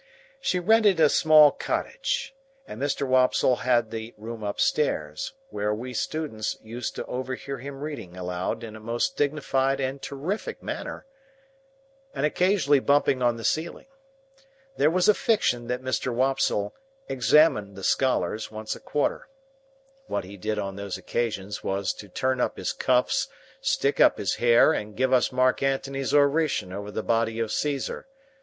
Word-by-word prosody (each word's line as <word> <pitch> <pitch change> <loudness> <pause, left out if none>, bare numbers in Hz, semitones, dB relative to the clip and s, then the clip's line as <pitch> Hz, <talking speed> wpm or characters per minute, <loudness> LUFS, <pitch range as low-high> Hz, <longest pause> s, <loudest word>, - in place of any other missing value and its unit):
She 185 - 0
rented 205 0 +4
a 155 -2 +6
small 155 -1 +7
cottage, - - -2 0.3
and 110 - -9
Mr. 140 0 0
Wopsle 130 -1 +3
had 120 -3 +1
the 115 0 -6
room 110 +1 -7
upstairs, 100 - -1 0.2
where 105 +1 -1
we 125 +3 -6
students 145 -10 -3
used 115 +2 -5
to - - -4
overhear 130 +1 -5
him 135 +2 -8
reading 115 - -6
aloud 90 +5 -3
in 110 -1 -8
a - - -9
most 115 +2 -1
dignified 135 -2 0
and 135 +1 -3
terrific 160 +10 -4
manner, - - -5 1.1
and 140 - 0
occasionally 155 -3 +3
bumping 140 -1 +2
on 120 -1 +2
the 115 - -8
ceiling. 160 +7 -2 0.9
There 145 - +3
was 180 +2 +2
a 210 - +7
fiction 125 - +1
that 125 +1 -3
Mr. 130 0 -1
Wopsle 125 -5 0 0.3
"examined" 125 -6 +3
the 95 - -9
scholars 110 -5 +1
once 110 0 -5
a - - -11
quarter. 145 - -2 0.8
What - - -2
he 95 +3 -10
did 105 +2 -3
on 100 -1 -4
those 100 -2 -4
occasions 105 0 -3
was 95 0 -1
to 105 - -11
turn 130 +6 -1
up - - -1
his - - -2
cuffs, 125 - +1 0.3
stick 270 - +1
up - - +6
his 95 - -1
hair, 120 -1 +5
and 105 0 -5
give 130 +1 +2
us 125 -2 +3
Mark 130 0 +2
Antony's 135 0 -1
oration 145 - +2
over 100 +1 -6
the 110 +1 -4
body 115 0 0
of 115 -1 -1
Caesar. 145 - -2
125 Hz, 155 wpm, -26 LUFS, 110-145 Hz, 1.1 s, small